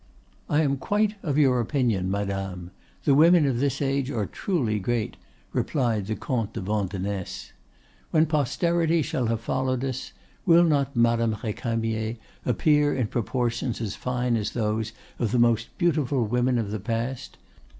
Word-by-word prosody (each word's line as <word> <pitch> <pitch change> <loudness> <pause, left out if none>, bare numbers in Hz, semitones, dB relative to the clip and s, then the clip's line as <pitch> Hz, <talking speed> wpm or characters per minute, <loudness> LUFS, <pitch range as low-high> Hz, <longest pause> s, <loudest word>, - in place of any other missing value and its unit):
"I 150 +1 +3
am 140 -2 +1
quite 205 +9 +1
of 145 -4 -1
your 130 -4 +4
opinion, 115 -7 0
madame; 95 -3 -3 0.3
the 140 - +4
women 165 +2 +6
of 130 -4 0
this 140 +1 0
age 135 -1 0
are 110 -7 -1
truly 120 - -1
great," 115 +2 -1 0.4
replied 115 -8 0
the 110 - -1
Comte 115 0 -2
de - - -4
Vandenesse. 100 -1 -3 0.6
"When 155 0 +4
posterity 165 +2 +1
shall 125 -2 -1
have 115 0 -1
followed 130 +1 -1
us, 130 -1 -4 0.3
will 170 -1 +6
not 140 -4 +1
Madame 115 -1 +3
Recamier 115 0 -2 0.3
appear 145 +4 +3
in 130 - +1
proportions 120 +1 -1
as 110 -3 -3
fine 125 -1 -1
as 105 -1 -3
those 110 -1 -1 0.3
of 115 -4 0
the 125 - +2
most 115 -1 +3
beautiful 145 -8 +1
women 125 +3 +1
of 110 -3 -2
the 110 - -3
past? 115 +4 -3
120 Hz, 150 wpm, -26 LUFS, 110-140 Hz, 0.6 s, women